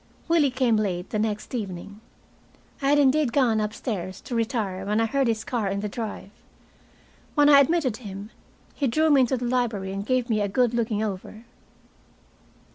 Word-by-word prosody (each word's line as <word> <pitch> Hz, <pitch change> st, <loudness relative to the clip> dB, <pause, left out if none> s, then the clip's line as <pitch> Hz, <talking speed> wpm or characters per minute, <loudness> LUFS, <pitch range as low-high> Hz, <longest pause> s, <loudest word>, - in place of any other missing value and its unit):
Willie 330 Hz, -4 st, +3 dB
came 250 Hz, -3 st, +2 dB
late 185 Hz, -4 st, -2 dB
the 215 Hz, -, -1 dB
next 215 Hz, +1 st, -2 dB
evening. 200 Hz, -2 st, -6 dB, 0.8 s
I 275 Hz, -, +1 dB
had 290 Hz, -, +5 dB
indeed 285 Hz, -1 st, +3 dB
gone 230 Hz, -5 st, +2 dB
up 210 Hz, 0 st, -1 dB
stairs 190 Hz, -6 st, -5 dB
to -, -, -8 dB
retire 220 Hz, -5 st, -1 dB
when 210 Hz, +2 st, 0 dB
I 225 Hz, -, +3 dB
heard 270 Hz, +3 st, +1 dB
his 225 Hz, -1 st, 0 dB
car 240 Hz, -7 st, -2 dB
in 200 Hz, +1 st, -2 dB
the 210 Hz, -, -2 dB
drive. 210 Hz, -2 st, -6 dB, 1.0 s
When 290 Hz, -1 st, +5 dB
I 285 Hz, -1 st, +8 dB
admitted 280 Hz, -5 st, +2 dB
him, 205 Hz, -2 st, -8 dB, 0.4 s
he 280 Hz, -, -1 dB
drew 310 Hz, +6 st, +2 dB
me 280 Hz, -2 st, +6 dB
into 255 Hz, +1 st, +1 dB
the 245 Hz, -, -4 dB
library 235 Hz, -6 st, -1 dB
and 195 Hz, 0 st, -3 dB
gave 255 Hz, +2 st, 0 dB
me 215 Hz, -3 st, +1 dB
a 205 Hz, -, +1 dB
good 240 Hz, +4 st, +1 dB
looking 225 Hz, -2 st, 0 dB
over. 215 Hz, +2 st, -6 dB
225 Hz, 185 wpm, -25 LUFS, 205-260 Hz, 1.0 s, I